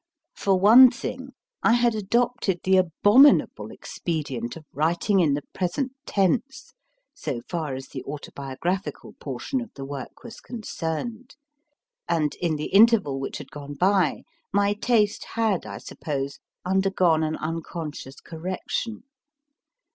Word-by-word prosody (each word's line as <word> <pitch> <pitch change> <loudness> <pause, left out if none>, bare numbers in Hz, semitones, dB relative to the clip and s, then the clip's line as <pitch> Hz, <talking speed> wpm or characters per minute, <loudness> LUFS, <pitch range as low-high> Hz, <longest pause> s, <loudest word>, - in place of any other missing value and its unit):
For 195 -2 +1
one 235 +7 +9
thing, 260 +2 -6 0.3
I 230 - +4
had 240 -1 +3
adopted 220 -2 0
the 190 0 +4
abominable 205 - +4
expedient 145 -8 -4
of 155 - -13
writing 170 +7 +1
in 150 -5 +3
the 145 - -4
present 195 +9 -1 0.2
tense 245 +8 0 0.4
so 120 - -4
far 160 -6 -3
as 135 +1 -8
the - - -6
auto 145 +1 -7
biographical 155 +8 -4
portion 265 -3 -3
of 240 - -8
the 135 - -6
work 140 -1 -8
was 235 -2 -10
concerned, 225 +2 -5 0.7
and, 155 -3 +1
in 170 -3 +1
the 150 +4 -5
interval 205 -10 +5
which 135 - -4
had - - -10
gone 145 0 -8
by, 185 +1 +2 0.3
my 200 +1 +2
taste 210 -1 +1
had, 220 -5 0
I - - -6
suppose, 140 -3 -5 0.3
undergone 185 -3 +2
an 155 0 -1
unconscious 155 -3 -6
correction. 185 +7 -4
185 Hz, 130 wpm, -25 LUFS, 155-225 Hz, 0.7 s, one